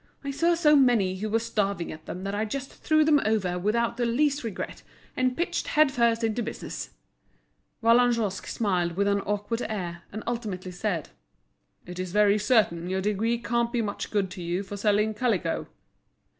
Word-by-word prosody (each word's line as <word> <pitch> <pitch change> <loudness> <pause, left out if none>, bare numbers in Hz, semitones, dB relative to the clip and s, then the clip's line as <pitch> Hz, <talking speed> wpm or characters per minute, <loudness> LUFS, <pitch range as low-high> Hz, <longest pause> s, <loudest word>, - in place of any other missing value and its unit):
I 280 - -3
saw 335 +5 +2
so 300 -3 +5
many 230 -9 +3
who 215 +3 -3
were 220 - +2
starving 200 -5 -1
at 155 0 -11
them 180 - -6
that 195 0 -3
I 210 +1 0
just 270 +5 -4
threw 310 -1 +2
them 295 -2 +4
over 190 -5 0
without 230 +5 0
the 245 - +1
least 280 +4 +1
regret, 220 -5 -5 0.3
and 255 0 0
pitched 345 - -1
head 305 -2 +4
first 235 -2 +2
into 225 +1 0
business." 225 - -5 0.9
Vallagnosc 230 -4 +3
smiled 180 -6 0
with 200 - +2
an 200 0 +2
awkward 205 +4 -2
air, 175 -5 -4
and 215 +1 -6
ultimately 210 -6 -4
said: 180 -3 -2 0.8
"It's 180 +1 -5
very 210 +2 +4
certain 205 -6 +2
your 190 +1 0
degree 210 +4 0
can't 235 0 0
be 235 -1 0
much 205 -1 -4
good 195 -3 0
to 185 - -7
you 175 +3 -2
for 200 +1 -7
selling 210 +1 +2
calico." 210 -8 -1
215 Hz, 175 wpm, -27 LUFS, 190-235 Hz, 0.9 s, so